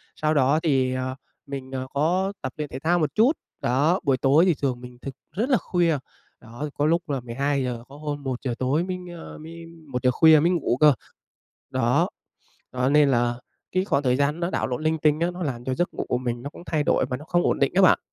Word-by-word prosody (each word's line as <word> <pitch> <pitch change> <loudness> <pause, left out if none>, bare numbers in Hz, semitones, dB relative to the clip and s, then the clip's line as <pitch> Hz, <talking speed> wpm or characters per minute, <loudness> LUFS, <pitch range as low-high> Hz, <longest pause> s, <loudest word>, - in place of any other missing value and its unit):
sau 155 0 0
đó 145 +1 +3
thì, 130 -4 +2
à, 130 0 -3 0.3
mình, 135 -2 -7
à, 130 - -2
có 180 +7 +1
tập 130 - -4
luyện 150 -1 -4
thể 130 - -6
thao 175 +4 +2
một 155 - -1
chút. 230 +6 +5 0.3
Đó, 145 +9 +2
buổi 135 -2 +2
tối 145 +7 +4
thì 180 - +4
thường 125 -3 -1
mình 125 0 -11
thức 135 - -7 0.2
rất 235 +7 0
là 255 - +5
khuya. 170 -5 +1 0.4
Đó, 120 +7 -6
có 145 - 0
lúc 170 0 +1
là 140 - -1
12:00, 125 0 -2
có 140 - -13
hôm 145 -1 -5
1:00 130 -1 -3
tối 135 +6 +1
mới, 185 0 -3 0.2
a, - - -10
mới 165 +2 -10 0.3
1:00 125 0 +1
khuya 160 +3 +6
mới 170 +4 +3
ngủ 160 -8 0
cơ. 150 -2 +8 0.8
Đó. - - +2 0.6
Đó, 125 +1 +1
nên 150 0 +5
là 120 -2 +2 0.4
cái 185 +1 +1
khoảng 145 - +1
thời 125 -1 +2
gian 145 +4 0
nó 170 - -1
đảo - - -1
lộn 125 +4 -3
linh 160 0 +1
tinh 150 +1 +2
á, 170 - +1
nó 180 0 -7
làm 125 -5 -3
cho 130 0 -1
giấc 175 +6 -1
ngủ - - -3
của 125 - +1
mình 120 -1 -3
nó 140 - -6
cũng 165 - -12
thay 155 -2 0
đổi - - +2
và 125 - -1
nó 150 - -11
không 175 +1 +1
ổn - - +1
định 140 - +2
á 195 - +4
bạn. 185 - +6
145 Hz, 240 wpm, -24 LUFS, 130-165 Hz, 0.8 s, cơ